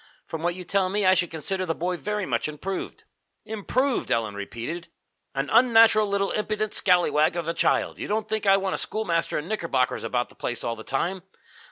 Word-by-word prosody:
From 160 - -6
what 175 +1 0
you 185 - -7
tell 190 +1 +1
me, 205 +1 0
I 185 - +6
should 180 -2 +1
consider 185 +4 -3
the 165 -3 -1
boy 180 +2 -1
very 210 +2 -3
much 120 0 -1
improved." 185 +6 -5 0.4
"Improved!" 240 +5 -1
Ellen 110 -3 +1
repeated. 120 - -6 0.5
"An 135 +1 -1
unnatural 225 -2 +6
little 200 0 0
impudent 215 0 -1
scallywag 170 -4 +3
of 170 -2 -3
a 165 - 0
child! 165 - +1
You - - -4
don't 215 +1 -1
think 215 -1 -2
I 195 0 +7
want 195 -1 -1
a - - -1
schoolmaster 175 -6 -1
in 150 - -4
knickerbockers 165 -11 0
about 125 -1 -1
the - - -18
place 120 -1 -4
all 115 - -2
the 110 - -10
time? 175 +10 -2
185 Hz, 200 wpm, -25 LUFS, 155-210 Hz, 0.5 s, I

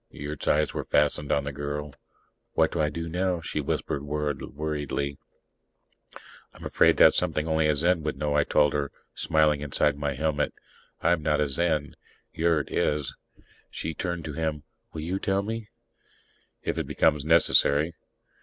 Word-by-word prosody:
Yurt's 75 0 -6
eyes 75 +1 +2
were - - -3
fastened 75 0 +1
on 70 - +2
the 70 - -4
girl. 75 +1 -5 0.6
"What - - +3
do - - -1
I 75 - +2
do 85 +1 -5
now?" 90 +1 0
she 80 -2 -3
whispered 70 0 -2
worriedly. 75 -1 -3 1.4
"I'm - - -11
afraid - - +4
that's - - +7
something 75 +1 -1
only 80 -1 +2
a 75 - +2
Zen 85 +3 +2
would 75 -3 -3
know," 75 0 -1
I 75 0 +4
told 75 0 +3
her, 70 -1 -1 0.2
smiling 75 -2 +2
inside 75 -1 +2
my 70 -1 -2
helmet. 75 +1 -1 0.5
"I'm 85 -1 +2
not 75 0 +1
a 75 - +2
Zen. 75 0 +1 0.4
Yurt 80 -3 +1
is." 75 -2 0 0.6
She 80 - -4
turned 85 -1 -4
to 75 - -5
him. 75 -1 -2 0.3
"You 80 +3 -4
will 95 - 0
tell 95 0 0
me?" 110 0 -5 0.9
"If - - -2
it - - -3
becomes 75 -2 +2
necessary." 80 -1 +4
75 Hz, 160 wpm, -27 LUFS, 75-80 Hz, 1.4 s, that's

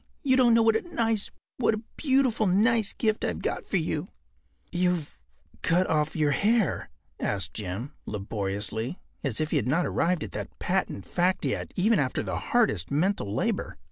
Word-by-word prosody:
You 260 -3 +4
don’t 245 -3 +5
know 230 - +5
what 225 0 +4
a 220 - +2
nice—what 225 - -1
a 215 - -7
beautiful, 260 -6 +2
nice 215 +3 +3
gift 220 -1 0
I’ve 85 - -2
got - - -2
for - - +1
you.” - - -1 0.6
“You’ve 175 - -1 0.4
cut 175 +3 +3
off 155 -2 0
your 150 -3 +2
hair?” 215 +5 +1 0.3
asked 90 -5 -1
Jim, 110 +8 -5
laboriously, 105 - -3 0.2
as 130 -6 -1
if 155 0 -1
he 155 - +3
had 130 - 0
not 165 +7 +2
arrived 175 -2 +1
at 105 - -6
that - - -6
patent 100 - -1
fact 180 +1 +1
yet - - -2
even 210 +3 +3
after 130 -2 0
the - - -3
hardest 85 - +2
mental 155 - 0
labor. - - -1
175 Hz, 170 wpm, -27 LUFS, -, 0.6 s, don’t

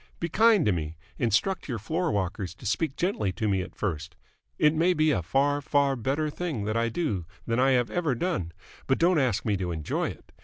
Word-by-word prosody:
Be 170 - -2
kind 220 -2 +4
to 105 - +4
me. 80 -2 -3 0.2
Instruct 120 - +1
your 120 - -1
floor 160 - -1
walkers 95 -2 -2
to - - -14
speak 135 - 0
gently 170 - 0
to 110 +4 -2
me 95 -2 +1
at 90 - -8
first. 85 -3 -3 0.4
It 150 0 +4
may 170 +3 +2
be 155 0 +3
a 90 - +1
far, 140 - +1
far 140 -1 +2
better 140 +6 -1
thing 155 -10 -3
that 110 +1 -1
I 115 0 +1
do 115 - -2 0.2
than 115 +1 0
I 135 +1 +4
have 125 -2 +1
ever 165 -7 0
done, 120 - -2 0.4
but 135 - +3
don't 170 -1 +3
ask 120 -6 0
me 105 -3 +1
to 90 -2 -3
enjoy 80 -3 -2
it! - - -12
130 Hz, 220 wpm, -27 LUFS, 100-155 Hz, 0.4 s, kind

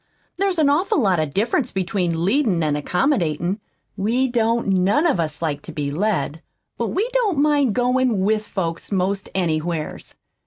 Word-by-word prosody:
There's 385 -1 0
an 310 -3 +4
awful 310 +5 +2
lot 190 - +2
of 155 -2 -1
difference 230 - 0
between 175 -3 -1
leadin' 205 - +2
an' 150 -1 +1
accommodatin'. 180 - 0 0.4
We 230 +7 +1
don't 230 -2 +1
none 195 - +2
of 300 - +2
us 155 0 -3
like 145 -3 -1
to - - -9
be 145 -2 -3
led, 165 -3 -1 0.3
but - - -2
we 420 +5 0
don't 445 - +1
mind 285 -6 +2
goin' 250 -4 +2
WITH 215 +2 +1
folks 170 -2 -4
'most 195 +1 -1
anywheres. 165 -3 -2
195 Hz, 160 wpm, -21 LUFS, 170-260 Hz, 0.4 s, an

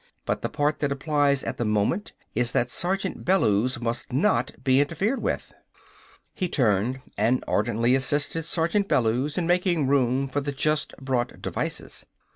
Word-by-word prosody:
But - - -1
the - - -2
part 150 +1 0
that 145 -2 0
applies 140 -1 +1
at - - -4
the - - -1
moment 105 - 0 0.2
is 120 +1 +1
that 120 - +1
Sergeant 190 +1 -1
Bellews 125 - +2
must 120 +2 -3
not 170 +11 +2
be 130 0 +4
interfered 195 - -1
with." - - -3 0.8
He 180 -3 -2
turned 120 0 +1 0.2
and 125 +2 +2
ardently 115 +3 +1
assisted 145 +4 +1
Sergeant 170 +5 0
Bellews 130 - +1
in 175 - 0
making 175 -3 +2
room 135 0 +2
for 145 +2 -2
the 140 0 -3
just 150 +2 0
brought 130 -3 -2
devices. - - -4
140 Hz, 155 wpm, -25 LUFS, 125-165 Hz, 0.8 s, be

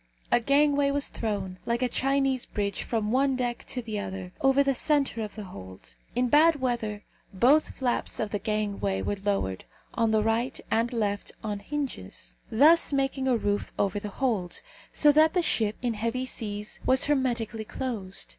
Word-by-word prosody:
A - - +5
gangway 285 +2 +3
was 285 0 -1
thrown, 195 -5 -3
like 235 +2 0
a - - +3
Chinese 270 0 +1
bridge, 200 -1 -2
from 220 -2 -1
one 270 +1 +2
deck 245 -2 -2
to 250 - -3
the 215 -2 -4
other, 190 -2 -6
over 270 +1 +4
the 275 0 +2
centre 275 -3 +1
of 210 -1 -5
the 215 - -6
hold. 95 - -11 0.2
In 250 0 +2
bad 305 +4 +5
weather, 225 -5 -2 0.3
both 260 +11 +3
flaps 250 -2 -1
of 215 -2 -2
the 205 - -1
gangway 200 - -1
were 205 - -2
lowered, 195 - -1 0.3
on 230 -1 +1
the 220 -1 +2
right 230 +4 0
and 230 +2 +1
left, 205 -4 -2
on 210 -2 -3
hinges, 205 - -5 0.2
thus 305 +9 +5
making 270 -1 0
a 250 -2 +3
roof 205 -2 -1
over 200 0 0
the 210 - -6
hold; 205 -7 -2 0.3
so 295 - +5
that 310 +3 +4
the 360 - +3
ship, 220 -8 +1
in 240 -2 +1
heavy 230 +4 -2
seas, 210 -3 -5
was 260 0 +4
hermetically 240 -6 0
closed. 210 -7 -5
230 Hz, 175 wpm, -27 LUFS, 205-270 Hz, 0.3 s, A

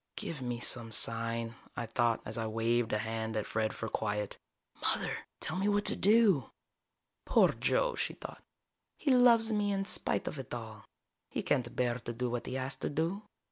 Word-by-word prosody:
Give 150 -5 -5
me 120 -1 -3
some 115 -2 0
sign, 115 +1 +1 0.2
I 120 - -2
thought, 115 0 +1
as 110 - -5
I 115 -1 -1
waved 115 +1 +1
a 105 - +2
hand 110 +1 -3
at 105 - -1
Fred 110 -1 -1
for 115 - -5
quiet. 105 -2 -2 0.4
Mother, - - -1
tell - - -2
me 195 - +1
what 205 0 +1
to - - +6
do! 205 - +4 0.8
Poor - - +5
Joe, - - +1
she - - -2
thought. - - -9 0.6
_He 285 - +1
loves 235 -3 +5
me 205 -1 +1
in 195 0 -1
spite - - 0
of 150 - -4
it 130 - -8
all. 110 -2 -8 0.4
He - - -3
can't 120 -1 0
bear 125 -1 0
to 120 - -6
do 125 +1 -2
what 120 -1 -3
he 130 - -4
has 130 +1 -2
to - - -3
do. 165 +7 -1
120 Hz, 190 wpm, -32 LUFS, 115-185 Hz, 0.8 s, to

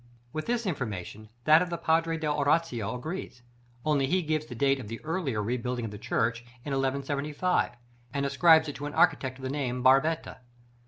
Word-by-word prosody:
With 155 - -4
this 235 -1 0
information 110 - -4
that 155 +4 +6
of 180 - -1
the 170 - -3
Padre 165 0 +1
dell' 150 -2 -1
Oratoria 145 -7 +1
agrees, 125 -1 -6 0.4
only 145 -3 +2
he 180 +4 +1
gives 155 0 -1
the 125 - -8
date 135 +3 +2
of 120 - -7
the 115 +2 -6
earlier 155 - -1
rebuilding 125 +1 -2
of 110 - -5
the 105 - -8
church 115 +1 0 0.2
in 145 - -4
1175, 140 +5 0 0.4
and 140 +2 -1
ascribes 160 +2 +5
it 145 - -4
to 145 +2 -4
an 145 - -7
architect 130 -1 +2
of 135 - -13
the 130 - -2
name 135 -4 -2
of 125 - -5
Barbetta. 135 +5 +3
140 Hz, 195 wpm, -28 LUFS, 125-160 Hz, 0.4 s, that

